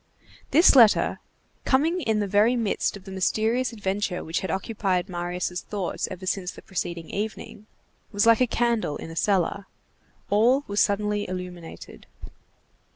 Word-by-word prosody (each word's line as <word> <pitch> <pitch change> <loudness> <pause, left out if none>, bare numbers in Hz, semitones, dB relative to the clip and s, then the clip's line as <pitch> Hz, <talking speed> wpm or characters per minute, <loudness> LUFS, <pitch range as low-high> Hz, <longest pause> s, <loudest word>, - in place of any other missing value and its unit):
This 325 0 +6
letter, 230 -5 +5 0.4
coming 320 +7 +1
in 220 -7 0
the 205 - -1
very 210 +5 +3
midst 220 -3 -1
of 195 - -16
the 195 - -10
mysterious 220 +7 0
adventure 195 -3 -2
which 165 +1 -2
had 190 - -5
occupied 190 -3 -1
Marius' 180 0 -3
thoughts 200 -4 -3
ever 185 0 -8
since 185 -1 -2
the - - -10
preceding 170 -3 -5
evening, 215 0 -5 0.4
was 205 +1 +1
like 230 +1 +5
a 250 - +4
candle 230 -10 0
in 165 - -8
a - - -9
cellar. 195 +1 0 0.6
All 240 +7 +4
was 205 0 -1
suddenly 205 0 0
illuminated. 180 -2 -8
205 Hz, 150 wpm, -25 LUFS, 180-225 Hz, 0.6 s, This